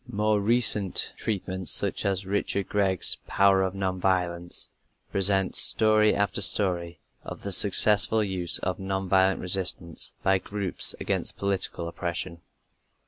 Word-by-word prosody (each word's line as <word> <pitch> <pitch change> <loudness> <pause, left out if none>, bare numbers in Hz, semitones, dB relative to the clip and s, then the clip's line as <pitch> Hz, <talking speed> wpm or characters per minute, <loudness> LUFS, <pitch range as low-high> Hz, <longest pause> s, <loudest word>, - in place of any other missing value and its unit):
More 105 -2 -2
recent 105 -3 +2
treatments 95 -3 -6
such - - +4
as 95 0 -3
Richard 100 0 -5
Gregg's 95 -3 +2
Power 100 -1 0
of 95 0 -5
Non 95 -1 -5
Violence 90 -2 -2 0.4
present 95 -1 +1
story 110 -1 +2
after 100 0 -4
story 90 -3 +4 0.3
of - - -12
the 100 - -7
successful 105 +3 +4
use 95 -4 -4
of 90 0 -6
non 95 0 -6
violent 95 0 -1
resistance 90 -3 -1
by 95 0 0
groups 100 -1 0
against - - -5
political 95 -3 -3
oppression. 85 0 -7
95 Hz, 130 wpm, -23 LUFS, 90-100 Hz, 0.4 s, such